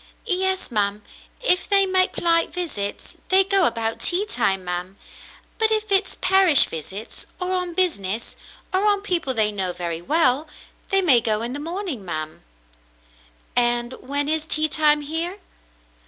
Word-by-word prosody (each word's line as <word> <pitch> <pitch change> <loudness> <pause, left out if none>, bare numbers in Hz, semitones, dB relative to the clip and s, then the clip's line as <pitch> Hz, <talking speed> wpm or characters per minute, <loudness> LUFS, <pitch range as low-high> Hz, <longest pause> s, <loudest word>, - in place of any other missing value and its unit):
"Yes, 380 - -1
ma'm. 205 -1 -1 0.4
If 375 -7 +2
they 395 -1 +4
make 370 -1 +2
polite 335 -1 +1
visits, 290 - -5
they 380 +1 +4
go 390 -2 +3
about 225 -1 -2
tea 365 +4 0
time, 195 - 0
ma'm. 180 +2 -5 0.6
But 445 0 +4
if 435 -1 -2
it's 390 0 +2
parish 370 -5 +8
visits, 190 +7 -7
or 365 0 -3
on 360 -2 -3
business, 230 - -2 0.4
or 385 +3 +1
on 405 -1 +1
people 340 -9 -2
they 215 -1 +3
know 190 -3 -2
very 170 -2 -5
well, 295 - +1 0.4
they 390 0 +2
may 265 -9 +5
go 215 0 -1
in 240 +2 -5
the 285 - -6
morning, 335 - -5
ma'm." 155 -3 -6 1.1
"And 240 0 +1
when 285 +2 -1
is 315 0 -2
tea 310 0 +2
time 300 -1 +2
here?" 325 +6 -3
310 Hz, 155 wpm, -21 LUFS, -, 1.1 s, parish